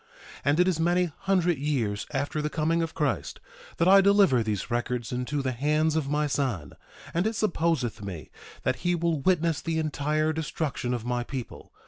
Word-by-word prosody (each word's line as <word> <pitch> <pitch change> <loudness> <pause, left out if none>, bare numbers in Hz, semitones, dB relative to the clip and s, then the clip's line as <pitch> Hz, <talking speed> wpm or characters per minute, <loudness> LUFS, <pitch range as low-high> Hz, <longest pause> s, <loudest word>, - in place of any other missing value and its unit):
1:2 - - -23
And 145 +3 +3
it 180 - +5
is 180 -4 +1
many 175 +1 +2
hundred 180 -5 +1
years 120 -8 -1
after 145 +2 -1
the 150 - -1
coming 165 +2 +1
of 165 -1 -3
Christ 150 -3 -1 0.4
that 170 - +2
I 195 +1 +8
deliver 195 - +5
these 110 0 -3
records 120 0 -2
into 130 +3 -2
the 130 - 0
hands 150 +5 +1
of 150 -4 0
my 150 +1 +1
son; 130 - -2 0.4
and 175 +5 +1
it 220 - -2
supposeth 165 - 0
me 90 -6 -7 0.3
that - - 0
he 175 0 0
will 170 -2 0
witness 170 -2 +2
the 165 -1 -2
entire 155 0 0
destruction 150 -5 -2
of 120 -1 -6
my 120 0 -1
people. 125 -1 -7
150 Hz, 185 wpm, -27 LUFS, 125-170 Hz, 0.4 s, I